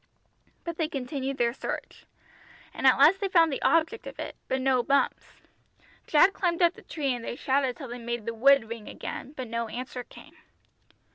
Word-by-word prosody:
But 335 -1 -5
they 320 - 0
continued 275 -2 -4
their 235 -1 +1
search. - - -6 0.7
And 270 - +1
at 260 - +6
last 310 +8 +6
they 395 - +1
found 330 -5 +4
the - - -4
object 330 +7 +1
of - - -9
it, - - -6
but 265 - 0
no 260 -1 +2
Bumps. 280 +3 0 0.7
Jack 340 +6 +5
climbed 350 -1 0
up 345 0 +5
the - - -15
tree 280 -5 -2
and 240 -2 -6
they 235 - -4
shouted 265 -2 0
till 270 -5 -8
they 245 +1 -6
made 235 -1 -4
the 230 - -3
wood 270 +1 +5
ring 225 -1 -7
again, 275 - -7
but 260 -4 -6
no 230 0 -3
answer 250 +2 -6
came. - - -16
270 Hz, 195 wpm, -27 LUFS, 245-315 Hz, 0.7 s, at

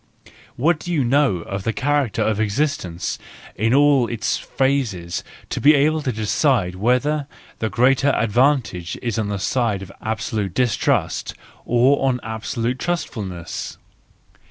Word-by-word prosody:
What 155 +5 +2
do 175 - -6
you 155 -6 +2
know 130 - +2
of 100 0 -4
the 115 - 0
character 145 -3 0
of 110 -1 0
existence 105 - -1 0.4
in 110 +3 +1
all 140 -2 +4
its 110 -2 -1
phases 115 -11 -1 0.3
to - - -2
be 150 +2 +7
able 155 +2 +2
to 135 - -1
decide 110 - +1
whether 125 +9 +1 0.3
the 110 - -1
greater 135 +4 +3
advantage 115 -6 +1
is 115 -2 -1
on 110 - -1
the 100 - -2
side 105 -1 0
of 95 - -10
absolute 110 -3 -3
distrust, 125 -3 0 0.3
or 135 +3 +3
of 125 - -2
absolute 115 +3 -3
trustfulness 100 - -4
120 Hz, 135 wpm, -21 LUFS, 105-140 Hz, 0.4 s, be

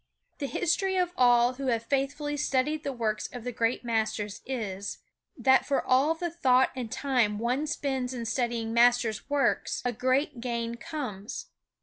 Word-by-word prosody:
The 280 - -2
history 380 +6 0
of 360 -1 +1
all 245 0 +5
who 270 +1 -5
have 230 -2 +1
faithfully 285 +3 -1
studied 295 +1 0
the 280 - -2
works 225 -4 -2
of 245 -2 -7
the 250 - -3
great 230 +1 0
masters 220 -3 -1
is, 205 -6 -4 0.4
that 265 0 +4
for 280 - +1
all 275 +5 +3
the 345 +1 -3
thought 260 -6 +3
and 245 -4 -5
time 245 -7 +1
one 250 +7 0
spends 265 -4 -2
in 240 -2 -4
studying 230 -1 -1
master 235 -1 +4 0.2
works 285 -1 +1
a 245 - +2
great 260 +3 0
gain 235 -1 -2
comes. 235 -6 -6
250 Hz, 160 wpm, -28 LUFS, 230-280 Hz, 0.4 s, all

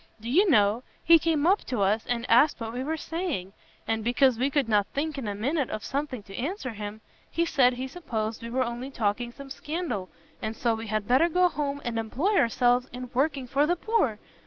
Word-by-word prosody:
Do 230 +2 -5
you 380 +8 +4
know, 210 -3 +4 0.2
he 335 0 +7
came 315 -2 +1
up 385 +4 +3
to 245 -5 -2
us, 210 +3 +1
and 240 -1 -1
asked 250 +6 +5
what 225 -1 -5
we 250 +2 -3
were 320 +3 -2
saying! 315 - -3 0.3
and 225 -1 -1
because 245 +1 +3
we 265 +2 +2
could 280 -3 +1
not 210 -2 +2
think 305 +2 -1
in 270 -6 -4
a 205 - -2
minute 270 +6 -1
of 215 0 -5
something 275 -5 -3
to 195 -1 -11
answer 275 - -3
him, 210 0 -7 0.3
he 335 - 0
said 260 -6 +4
he 255 +2 -4
supposed 230 -8 -4
we 230 - -6
were 255 +2 +1
only 240 +2 -5
talking 235 -1 -1
some 275 +2 -11
scandal, 295 - -4 0.3
and 220 - -3
so 235 0 +1
we 225 0 -5
had 215 -1 -2
better 265 +8 +4
go 360 +2 +4
home, 285 -3 -3
and 230 -1 -1
employ 280 - 0
ourselves 245 - +3
in 250 0 -7
working 275 0 0
for 280 +4 +2
the 350 - +2
poor! 355 - 0
250 Hz, 220 wpm, -27 LUFS, 225-295 Hz, 0.3 s, he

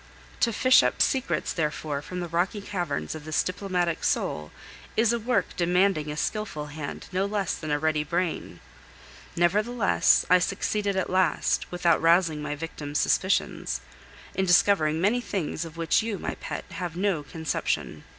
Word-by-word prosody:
To 235 - +3
fish 255 +3 +5
up - - 0
secrets, 265 -1 +1
therefore, 150 -2 -2
from 180 +4 -6
the 175 - -3
rocky 175 +5 0
caverns 175 -7 -3
of 155 -1 -8
this 155 0 0
diplomatic 180 -3 -2
soul 75 0 -1 0.5
is 225 +1 +4
a 235 - 0
work 225 -4 0
demanding 180 -2 +2
a 150 - -4
skilful 155 -7 -3
hand 150 -2 -6
no 190 +2 0
less 200 -3 -1
than 155 - -6
a 145 - +2
ready 155 0 +1
brain. 170 +2 -3 0.7
Nevertheless, 210 +7 +3
I 180 +1 +6
succeeded 200 +2 -1
at 190 -1 -1
last, 185 -1 +1
without 175 -2 +2
rousing 165 -2 +3
my 150 0 -3
victim's 150 -2 -5
suspicions, 190 +6 +1 0.5
in 190 - 0
discovering 170 -3 +4
many 210 +7 +2
things 170 -7 -3
of 165 0 -10
which 165 +3 +2
you, 220 -2 -3
my - - -4
pet, - - -6
have 175 -2 -5
no 190 -5 +1
conception. 160 +1 -3
175 Hz, 160 wpm, -26 LUFS, 155-200 Hz, 0.7 s, I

